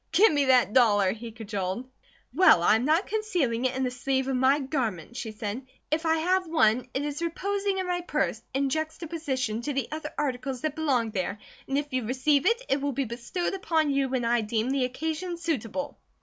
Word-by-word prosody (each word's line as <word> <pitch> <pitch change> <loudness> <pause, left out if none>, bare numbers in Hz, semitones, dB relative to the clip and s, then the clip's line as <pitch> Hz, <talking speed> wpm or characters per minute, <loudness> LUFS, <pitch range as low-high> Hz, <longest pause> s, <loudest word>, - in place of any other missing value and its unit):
"Give 370 +2 +5
me 285 -1 +2
that 255 -5 +4
dollar!" 205 -6 +4
he 225 +2 -7
cajoled. 210 0 -4 0.5
"Well, 365 - +6
I 210 - +5
am 235 - -2
not 320 +6 +3
concealing 350 - -1
it 255 0 0
in 265 - -1
the 250 - 0
sleeve 265 +1 -1
of 270 - 0
my 260 +2 +4
garments," 240 - -3
she 220 - -5
said. 215 +4 -5 0.2
"If 320 +2 0
I 320 0 +3
have 365 +3 +1
one, 250 -7 +3
it 275 +2 0
is 295 +1 -4
reposing 395 +4 -1
in 375 - -1
my 355 0 -1
purse, 350 - -1
in 270 +1 0
juxtaposition 310 -7 -2
to 290 +4 -3
the 270 -3 -1
other 310 -1 -4
articles 260 -2 -2
that 310 -2 -2
belong 260 -8 +1
there, 200 0 -2 0.3
and 270 - 0
if 290 -1 -3
you 255 -1 0
receive 265 +5 +2
it, 465 +2 +2
it 270 +1 +1
will 285 0 -1
be 275 +1 -1
bestowed 245 - -3
upon 320 -6 +1
you 275 -1 +1
when 255 -2 -1
I 235 0 +2
deem 220 +3 -1
the 270 -2 +1
occasion 320 +7 -3
suitable." 285 -4 -3
270 Hz, 205 wpm, -27 LUFS, 240-315 Hz, 0.5 s, Well